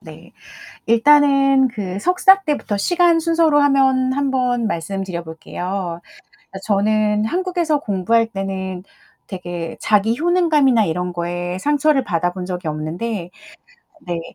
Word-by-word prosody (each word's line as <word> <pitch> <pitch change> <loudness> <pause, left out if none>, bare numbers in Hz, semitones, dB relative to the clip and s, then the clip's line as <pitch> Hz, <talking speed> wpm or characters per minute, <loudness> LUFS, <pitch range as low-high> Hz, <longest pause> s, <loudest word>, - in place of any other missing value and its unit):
네. - - -14 0.6
일단은 275 +2 +4
그 195 -5 -5
석사 365 - +4
때부터 295 - -2
시간 345 - +2
순서로 325 -2 +2
하면 265 -2 +2
한번 255 -4 0
말씀 195 +2 -4
드려볼게요. 175 +1 -6 0.3
그러니까 195 - -13
저는 210 0 +1
한국에서 345 +1 -1
공부할 225 0 0
때는 190 -3 -5 0.4
되게 175 -3 -6
자기 215 +2 +1
효능감이나 305 - +3
이런 180 +2 -3
거에 175 +1 -4
상처를 290 +1 +1
받아 175 -5 -1
본 180 0 -7
적이 180 -2 -5
없는데 170 +5 -5 0.7
네 175 -8 -4
220 Hz, 275 characters per minute, -19 LUFS, 180-285 Hz, 0.7 s, 일단은